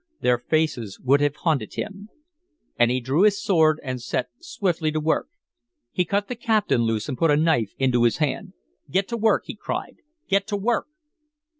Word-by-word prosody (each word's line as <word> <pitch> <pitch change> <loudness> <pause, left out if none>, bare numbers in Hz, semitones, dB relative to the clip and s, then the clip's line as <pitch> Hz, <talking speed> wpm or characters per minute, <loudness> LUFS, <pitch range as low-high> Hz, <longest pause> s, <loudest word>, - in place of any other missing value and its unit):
Their 125 -1 +2
faces 125 -7 -1
would 140 +2 +3
have 145 0 +1
haunted 150 -11 -1
him. 205 0 -6 0.7
And 120 0 +4
he 125 +1 +1
drew 130 +7 0
his 205 -1 +4
sword 160 -7 +3
and 130 -2 -4
set 120 - -2
swiftly 185 - -1
to 155 - -1
work. 155 +1 0 0.6
He 180 - 0
cut 200 +4 0
the - - -3
captain 220 - +1
loose 115 -2 -1
and 140 - -3
put 165 - +3
a 145 - +4
knife 130 -10 +2
into 130 -3 +2
his 120 -1 +3
hand. 150 -4 -2 0.4
"Get 190 +1 +1
to 235 - -2
work!" 220 0 +2
he - - -7
cried. - - -5 0.3
"Get 200 +1 +1
to 205 -2 -1
work!" 230 +4 0
155 Hz, 185 wpm, -24 LUFS, 130-200 Hz, 0.7 s, And